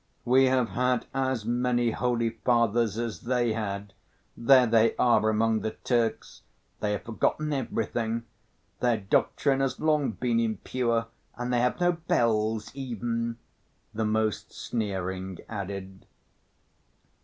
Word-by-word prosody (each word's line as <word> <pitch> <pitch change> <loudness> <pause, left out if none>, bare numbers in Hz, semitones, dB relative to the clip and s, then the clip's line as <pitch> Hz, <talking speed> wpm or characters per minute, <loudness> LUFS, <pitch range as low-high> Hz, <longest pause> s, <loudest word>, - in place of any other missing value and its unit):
"We 130 +2 +5
have 130 -3 +2
had 125 +4 0
as 130 -4 -1
many 120 0 +1
holy 115 -1 0
fathers 115 -2 +1
as 115 -2 -3
they 120 -2 0
had. 100 -2 -4 0.4
There 130 +1 +6
they 115 -1 +3
are 110 -3 +3
among 110 0 +2
the 110 - -3
Turks, 120 -3 -1 0.4
they 105 -1 0
have 105 - -4
forgotten 150 +6 -1
everything. 115 -3 -2 0.6
Their 120 -2 +2
doctrine 135 +7 +1
has 135 -1 -1
long 150 -6 +1
been 120 -1 0
impure 115 +1 0 0.3
and 125 +1 -2
they 120 - +3
have 125 +7 +1
no 175 0 +4
bells 110 -9 0
even," 115 -3 -3 0.6
the 110 +1 -1
most 110 0 0
sneering 95 -4 -3
added. 95 -2 -6
115 Hz, 125 wpm, -27 LUFS, 110-125 Hz, 0.6 s, There